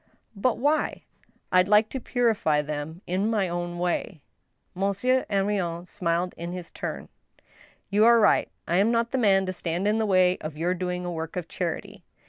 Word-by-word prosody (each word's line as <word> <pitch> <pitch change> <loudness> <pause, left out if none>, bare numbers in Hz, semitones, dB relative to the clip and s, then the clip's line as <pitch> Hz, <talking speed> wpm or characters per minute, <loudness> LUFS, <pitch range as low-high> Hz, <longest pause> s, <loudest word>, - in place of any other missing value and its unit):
"But 225 +4 +1
why?" 295 +4 0 0.2
" - - -9
rd 185 0 +5
like 210 +1 +5
to 265 - -4
purify 220 - +1
them 150 +3 -5
in 190 +5 0
my 210 -4 +1
own 175 0 -4
way." 175 -1 -2 0.5
Monsieur 200 +7 0
Henrion 195 -4 -1
smiled 175 0 -1
in 170 +1 -5
his 180 -2 -7
turn. - - -5 0.8
"You 205 +2 +4
are 235 0 +7
right. 210 - +3 0.2
I'm 190 +6 +3
not 235 0 +1
the 265 - 0
man 195 -4 +4
to 185 - -3
stand 175 +2 -2
in 215 +2 +2
the 220 - +1
way 185 -2 +3
of 155 -1 -6
your 175 +3 0
doing 180 0 -3
a 175 - -3
work 160 0 -5
of 180 -2 -4
charity." 170 -1 -4
185 Hz, 180 wpm, -26 LUFS, 175-210 Hz, 0.8 s, are